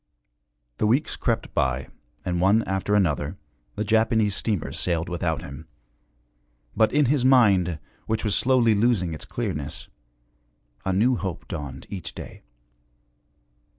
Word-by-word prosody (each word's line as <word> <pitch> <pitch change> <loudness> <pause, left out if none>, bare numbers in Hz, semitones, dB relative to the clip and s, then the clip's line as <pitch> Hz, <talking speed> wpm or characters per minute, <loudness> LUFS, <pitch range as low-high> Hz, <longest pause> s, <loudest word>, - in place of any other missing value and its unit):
The 105 - +2
weeks 130 +8 +1
crept - - -1
by 65 0 0 0.4
and, 90 -1 -1
one 105 +4 +4
after 95 +2 0
another, 90 -8 +1 0.4
the 105 - -1
Japanese 110 -1 +2
steamers 105 -7 -2
sailed 85 -1 0
without 85 -2 -2
him; 75 0 -9 1.1
but 110 0 +4
in 150 0 +3
his 135 0 +2
mind, 100 - +4 0.3
which 110 0 -1
was 105 - +1
slowly 125 -3 +4
losing 100 -6 +2
its 75 - -7
clearness, 70 -2 -4 1.0
a 95 - +1
new 115 +7 +3
hope 95 -2 -5
dawned 70 -3 -6
each 95 -4 -6
day. - - -9
100 Hz, 130 wpm, -25 LUFS, 85-115 Hz, 1.1 s, one